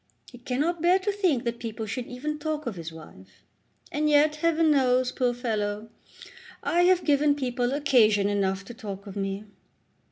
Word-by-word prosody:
He 245 - -13
cannot 295 +8 -1
bear 355 +2 +5
to 385 +2 -1
think 365 - +1
that 235 0 -3
people 225 -1 -5
should 240 +3 -4
even 300 +5 -5
talk 305 -1 -3
of 235 - -3
his 165 -1 -7
wife. 95 - -15 0.5
And 300 +1 0
yet, 300 +1 +4
Heaven 325 0 +2
knows, 255 -2 +3
poor 250 -2 0
fellow, 215 -3 -3 0.7
I 345 - +2
have 365 0 +4
given 290 0 +3
people 250 -3 -1
occasion 235 -8 +3
enough 195 -1 -1
to 240 - -9
talk 200 -3 -8
of 200 -1 -9
me. 195 +1 -3
250 Hz, 170 wpm, -26 LUFS, 210-300 Hz, 0.7 s, bear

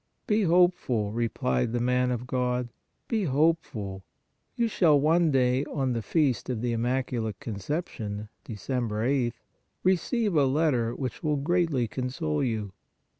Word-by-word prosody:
" - - -48
Be 215 0 +2
hopeful," 175 - +2
replied 110 - 0
the 120 - +1
man 125 +1 +2
of 125 0 -2
God, 125 -1 -1 0.4
"be 220 -4 0
hopeful; 135 - 0 0.5
you 235 - +1
shall 165 -9 +4
one 165 +3 +3
day 130 -1 +2
on 135 -4 -1
the 115 - -1
Feast 130 - 0
of 120 -4 -2
the 120 - 0
Immaculate 120 -2 -1
Conception 110 - -4 0.2
(Dec. 110 - -7 0.2
8th) 120 +2 0 0.5
receive 195 +2 +1
a 145 -2 +5
letter 130 -5 +1
which 130 -2 -4
will 150 -2 0
greatly 155 -4 +1
console 125 - -2
you." 110 -5 -2
125 Hz, 140 wpm, -27 LUFS, 115-155 Hz, 0.5 s, a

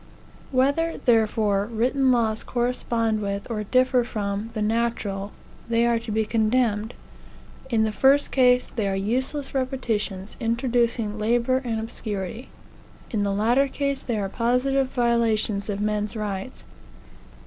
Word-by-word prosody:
Whether, 280 +6 +1
therefore, 215 -3 +2
written 255 +4 +1
laws 225 -3 +1
correspond 235 -3 -1
with, 200 0 -3
or 210 -2 -2
differ 255 +2 +3
from, 205 -1 -3
the 215 - -2
natural, 210 -3 -1 0.4
they 230 0 +3
are 235 -1 +2
to 225 -1 -7
be 220 +1 +1
condemned. 220 0 +1 0.7
In 225 -3 +2
the 220 - 0
first 275 +6 +3
case, 250 -1 +4
they 215 -4 0
are 195 - 0
useless 260 +8 -2
repetitions, 225 -7 -2
introducing 235 -2 0
labor 240 +4 +1
and 230 -3 -2
obscurity. 220 0 -5 0.6
In 215 - 0
the 200 0 0
latter 235 +7 +2
case, 280 0 -2
they 235 -3 -2
are 200 -2 -1
positive 250 +5 +1
violations 230 -5 +1
of 200 -1 -2
men's 210 +1 -1
rights. 210 +2 -5
230 Hz, 135 wpm, -24 LUFS, 210-250 Hz, 0.7 s, case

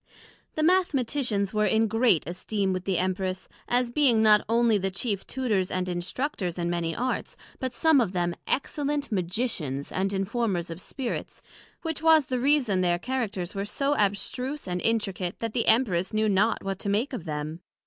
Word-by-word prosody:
The 310 - 0
Mathematicians 270 - +1
were 215 0 +2
in 220 0 +3
great 225 -5 +3
esteem 190 +3 -2
with 185 0 -4
the 190 -3 +1
Empress, 185 +1 -2 0.2
as 245 0 +1
being 240 -5 +4
not 210 -1 +6
onely 230 -2 +3
the 195 0 -1
chief 200 +1 -3
Tutors 215 -8 0
and 185 0 -2
Instructors 180 - -3
in 175 0 -1
many 170 -1 -1
Arts, 255 +2 -2 0.2
but 260 -1 -2
some 315 +1 +4
of 210 -6 0
them 175 -2 0
excellent 285 0 -1
Magicians 180 - -2
and 195 +1 -1
Informers 195 -3 -1
of 165 +2 -7
spirits, 255 -4 -5 0.4
which 320 -3 -3
was 320 -2 +5
the 255 -1 -2
reason 255 -8 +3
their 175 -1 +2
Characters 210 -6 -3
were 195 - -2
so 275 +8 0
abstruse 230 +6 -1
and 180 0 -2
intricate, 195 -6 -1
that 225 -2 -4
the 235 - 0
Emperess 195 -6 +3
knew 215 0 +2
not 210 +3 +2
what 195 -1 -3
to 200 - -3
make 220 +8 0
of 215 -10 -5
them. 150 +1 -4
210 Hz, 175 wpm, -27 LUFS, 185-250 Hz, 0.4 s, not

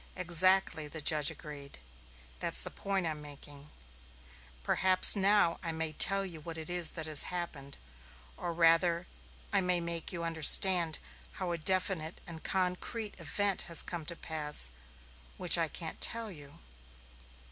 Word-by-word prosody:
"Exactly," 180 -2 +3
the 160 +2 -7
judge 150 -1 +2
agreed. 145 -2 -11 0.6
"That's - - -2
the - - -8
point 195 -2 -4
I'm 155 -2 -5
making. 145 0 -13 0.9
Perhaps 185 +2 +4
now 200 -3 +1
I 165 - -4
may 160 -1 -5
tell 195 +5 +7
you 165 -4 -10
what 165 +1 -8
it 160 +1 -8
is 175 -3 +1
that 160 - -2
has 155 -2 +4
happened. 160 -6 -7 0.6
Or 175 - -6
rather, 170 +1 +1 0.5
I 200 - +2
may 180 -1 -1
make 170 -1 -5
you 170 -3 -6
understand 165 +1 +4 0.4
how 185 -3 -5
a 170 - -3
definite 180 -1 -1
and 165 -2 -11
concrete 190 +4 -4
event 195 +5 -2
has 170 - +4
come 170 -3 -7
to 170 - -5
pass, 150 - 0 0.7
which - - +2
I - - -1
can't - - -9
tell 230 -2 -1
you." 145 -5 -15
170 Hz, 145 wpm, -30 LUFS, 155-185 Hz, 0.9 s, tell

